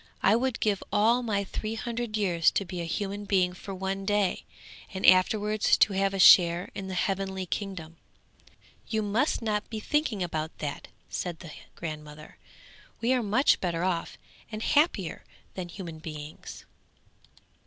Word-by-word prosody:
'I 200 - +5
would 255 0 -1
give 205 -3 +1
all 230 +4 +3
my 210 -4 -1
three 215 +3 -4
hundred 235 -1 -3
years 175 -6 +3
to 200 - -1
be 180 -1 -5
a - - -3
human 200 +4 -3
being 185 -3 +2
for 190 +2 -9
one 195 +1 -3
day, 205 -1 0 0.5
and 190 -1 -3
afterwards 210 +3 +4
to 205 - +4
have 195 0 +1
a - - -2
share 175 -2 +6
in 195 - -6
the 190 - -5
heavenly 190 0 -1
kingdom.' 170 -4 -5 0.9
'You 220 -1 -1
must 230 +6 0
not 210 -1 -1
be 220 - -4
thinking 250 -5 0
about 160 -2 -4
that,' 145 -2 -5 0.2
said 175 -3 -4
the 165 - -9 0.2
grandmother; 150 -2 -8 0.6
'we 240 +3 +2
are 255 - +2
much 225 +6 +3
better 170 -2 -1
off 180 -3 -2 0.3
and 215 0 -5
happier 290 - +1 0.3
than 180 -2 -6
human 170 -3 -8
beings.' 155 -1 -9
195 Hz, 155 wpm, -28 LUFS, 175-215 Hz, 0.9 s, share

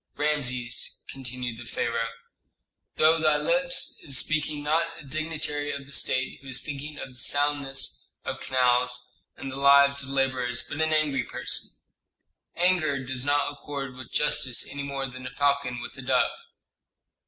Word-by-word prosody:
"Rameses," 125 -5 +1
continued 125 -3 -5
the - - -10
pharaoh, 115 -1 -1 0.9
"through 160 +1 +5
thy 155 -1 +4
lips 265 - +2
is 135 -4 +1
speaking 155 0 0
not 155 +3 +2 0.2
a - - -11
dignitary 150 0 -3
of 140 -1 -6
the 140 - -15
state 130 -1 +1
who 135 - -13
is 130 -1 +1
thinking 150 0 -6
of 135 -2 -7
the 125 - -16
soundness 145 0 +1 0.2
of - - -3
canals 125 -1 +1 0.2
and 135 - -6
the 130 - -6
lives 140 0 +6
of 130 - -6
laborers, 130 -2 0
but 150 - -3
an 160 0 +2
angry 150 -4 +2
person. 125 0 -2 0.9
Anger 155 -7 +2
does 130 -1 -4
not 145 0 +2
accord 140 -2 -6
with 130 -1 -11
justice 130 -4 +2
any 140 - -5
more 140 -1 -3
than 130 0 -7
a - - -4
falcon 140 -3 +1
with - - -8
a - - -4
dove." - - +2
140 Hz, 160 wpm, -27 LUFS, 125-150 Hz, 0.9 s, lives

